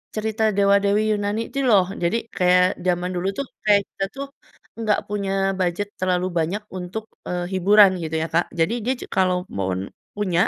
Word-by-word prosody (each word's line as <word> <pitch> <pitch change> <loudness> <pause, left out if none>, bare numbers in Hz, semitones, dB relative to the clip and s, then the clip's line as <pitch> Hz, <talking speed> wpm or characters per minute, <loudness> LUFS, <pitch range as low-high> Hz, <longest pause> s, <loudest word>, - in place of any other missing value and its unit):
cerita 220 +1 -1
dewa-dewi 200 +1 +3
Yunani 205 +1 -1
itu 275 - -3
loh 200 -6 +5 0.2
jadi 170 +7 +2 0.2
kayak 180 0 +3
zaman 180 0 +1
dulu 180 +2 -1
tuh - - -1 0.2
kayak 205 -1 +6
kita 195 - -2
tuh, 275 +1 -5 0.5
enggak 215 -2 +1
punya 200 -2 -2 0.3
budget 185 +3 -1
terlalu 185 -1 +1
banyak 180 +7 -1 0.2
untuk, 205 +5 -6 0.2
eee, 180 0 -2
hiburan 195 +2 +6
gitu 160 0 -3
ya - - -2
Kak 170 +1 +2
jadi 165 +4 +1
dia 255 +4 +1
ju - - -7
kalau 185 -2 +1
mau 95 -1 -2
n 95 +1 -5 0.2
punya, 185 -4 +1
195 Hz, 180 wpm, -22 LUFS, 180-210 Hz, 0.5 s, kayak